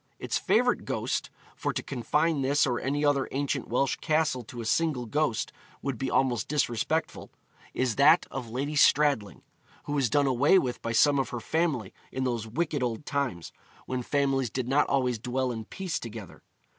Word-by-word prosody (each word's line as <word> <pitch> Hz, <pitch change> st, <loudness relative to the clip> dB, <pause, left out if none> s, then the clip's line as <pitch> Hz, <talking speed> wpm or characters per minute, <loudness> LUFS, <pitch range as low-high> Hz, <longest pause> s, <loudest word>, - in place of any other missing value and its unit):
Its -, -, -2 dB
favourite -, -, +2 dB
ghost -, -, -2 dB, 0.3 s
for -, -, -2 dB
to -, -, -4 dB
confine 150 Hz, +4 st, 0 dB
this 140 Hz, +2 st, +3 dB
or 125 Hz, -3 st, 0 dB
any 145 Hz, +3 st, -1 dB
other 140 Hz, -2 st, +2 dB
ancient 140 Hz, -1 st, -2 dB
Welsh 130 Hz, +2 st, 0 dB
castle 155 Hz, -5 st, +1 dB
to 120 Hz, +1 st, -10 dB
a 115 Hz, -, -5 dB
single 145 Hz, 0 st, +1 dB
ghost 145 Hz, -1 st, -1 dB, 0.3 s
would 135 Hz, -4 st, -3 dB
be 135 Hz, -, -1 dB
almost 130 Hz, -3 st, +1 dB
disrespectful 150 Hz, +2 st, -1 dB, 0.5 s
is 125 Hz, -4 st, 0 dB
that 155 Hz, +5 st, +6 dB
of 125 Hz, -4 st, -5 dB
Lady 140 Hz, +6 st, -3 dB
Stradling, 140 Hz, -8 st, +3 dB, 0.4 s
who 145 Hz, -, -4 dB
was 135 Hz, -5 st, +1 dB
done 145 Hz, +4 st, +3 dB
away 135 Hz, +7 st, +4 dB
with 125 Hz, -8 st, -1 dB
by 115 Hz, -, -3 dB
some 140 Hz, +5 st, +4 dB
of 135 Hz, -, -1 dB
her 120 Hz, -, -4 dB
family 130 Hz, -, -1 dB, 0.2 s
in 130 Hz, -, -2 dB
those 120 Hz, -4 st, -2 dB
wicked 150 Hz, +4 st, -1 dB
old 120 Hz, +2 st, -2 dB
times 135 Hz, -, -2 dB, 0.3 s
when 130 Hz, -1 st, -3 dB
families 135 Hz, -1 st, 0 dB
did 125 Hz, +2 st, -3 dB
not 140 Hz, +3 st, +3 dB
always 125 Hz, -4 st, +1 dB
dwell 125 Hz, +2 st, -1 dB
in 110 Hz, -2 st, -5 dB
peace 185 Hz, -, -4 dB
together. 110 Hz, -4 st, -9 dB
135 Hz, 180 wpm, -28 LUFS, 120-145 Hz, 0.5 s, that